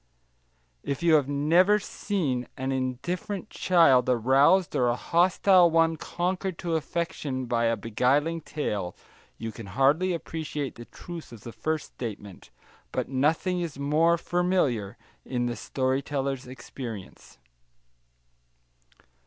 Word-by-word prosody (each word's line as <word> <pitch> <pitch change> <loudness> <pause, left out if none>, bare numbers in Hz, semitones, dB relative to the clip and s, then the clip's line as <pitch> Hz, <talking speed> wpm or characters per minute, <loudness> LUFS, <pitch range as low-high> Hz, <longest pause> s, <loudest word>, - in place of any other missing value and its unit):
If 140 - -4
you 170 -1 +4
have 145 -3 +4
never 170 +8 +4
seen 170 -11 -2
an 130 +1 -2
indifferent 135 - -3
child 135 -9 +4
aroused 135 - +4
or 125 - +2
a 120 - +2
hostile 180 +4 +4
one 165 0 +3
conquered 180 +3 -3
to 170 -2 -2
affection 155 -5 -3
by 120 -1 0
a 115 0 +1
beguiling 140 +9 +1
tale, 105 - -3 0.4
you 115 0 -5
can 110 -1 -10
hardly 145 - +2
appreciate 150 -4 -4
the 120 - -11
truth 170 +1 -10
of 115 -3 -11
the 115 - -8
first 155 +5 -2
statement; 105 -5 -8 0.4
but - - -2
nothing 160 +7 +1
is 165 -5 -5
more 155 +4 +3
familiar 170 - 0 0.3
in 125 -2 -2
the 120 -1 -2
story 130 +2 -1
teller's 135 -2 -3
experience. 110 - -9
140 Hz, 125 wpm, -27 LUFS, 125-170 Hz, 0.4 s, you